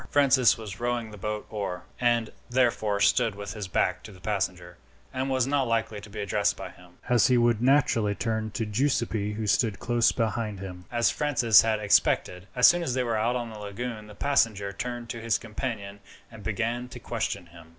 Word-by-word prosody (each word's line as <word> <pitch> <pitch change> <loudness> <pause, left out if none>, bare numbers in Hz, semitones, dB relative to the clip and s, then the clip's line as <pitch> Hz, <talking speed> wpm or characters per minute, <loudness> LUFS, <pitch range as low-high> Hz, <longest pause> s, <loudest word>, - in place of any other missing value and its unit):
Francis 135 -4 +4
was 105 -3 -8
rowing 120 -2 -2
the 105 - -10
bow 105 +2 -4
oar, 100 -4 -4 0.2
and 120 -2 +1 0.2
therefore 115 -5 +1
stood 115 0 +3
with 100 -1 -6
his 105 -3 -5
back 90 - 0
to 110 - -11
the 95 - -15
passenger, 90 -4 -3 0.4
and 130 +1 -2
was 130 -2 +2
not 135 -1 +1
likely 115 -2 -1
to 105 - -12
be 105 +1 -8
addressed 100 -2 0
by - - -7
him, 90 0 -18
as 120 -3 +4
he 125 - +4
would 120 -2 +3
naturally 125 -6 +3
turn 110 -1 -2
to 110 +2 -3
Giuseppi, 110 -3 0
who 110 +1 -4
stood 105 0 +1
close 120 +2 +2
behind 110 -3 -2
him. 90 -2 -8
As 120 -1 +2
Francis 125 -7 +4
had 110 -1 0
expected, 100 -2 +2
as 125 - +5
soon 175 0 +6
as 130 -7 -2
they 130 - +1
were 115 -2 -1
out 115 +3 +1
on 120 -2 -3
the 110 - -9
lagoon 105 +2 -6
the 105 - -12
passenger 105 -7 +1
turned 120 +2 -5
to 115 - -5
his 115 -1 +1
companion 105 -3 -5 0.3
and 110 -2 -11
began 115 +3 -2
to - - -10
question - - -3
him. 85 -1 -15
110 Hz, 200 wpm, -27 LUFS, 100-120 Hz, 0.4 s, soon